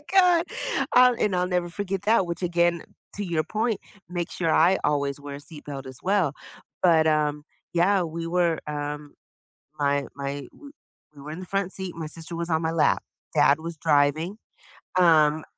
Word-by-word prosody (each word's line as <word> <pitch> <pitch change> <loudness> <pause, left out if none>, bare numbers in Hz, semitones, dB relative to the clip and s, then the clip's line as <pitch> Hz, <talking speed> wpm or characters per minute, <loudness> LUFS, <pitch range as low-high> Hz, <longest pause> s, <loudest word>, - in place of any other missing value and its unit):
god. 360 -3 +5 0.5
I'll 250 0 +7
and 210 -5 0
I'll 180 0 +1
never 180 -1 0
forget 195 +1 -3
that, 210 -2 +3
which 170 +2 -5
again, 170 -1 +1 0.3
to 205 - -3
your 165 -4 0
point, 220 +4 -1 0.3
make 175 -1 -3
sure 165 -2 -1
I 180 +4 +5
always 140 -1 0
wear 140 0 -7
a - - -10
seat 150 +1 -12
belt, 140 -2 -7
as 130 -1 -9
well. 185 -6 +2 0.5
But, 165 -3 +5
um, 150 -1 +1 0.3
yeah, 185 +3 +3
we 165 0 -4
were 170 -1 +1
um, 150 0 -5 0.7
my 140 -1 +1
my 140 0 -5
we 285 -1 -13 0.4
we 140 - -12
were 150 +2 -8
in 160 - -6
the - - -7
front 195 0 -2
seat, 190 -2 -5
my 165 -2 -5
sister 165 +2 -7
was 170 +1 -3
on 160 -1 +1
my 160 0 0
lap. 165 -2 +2 0.3
Dad 145 +2 +4
was 165 +1 -6
driving, 155 +5 +2 0.6
um, 155 -3 +4
165 Hz, 180 wpm, -25 LUFS, 150-185 Hz, 0.7 s, I'll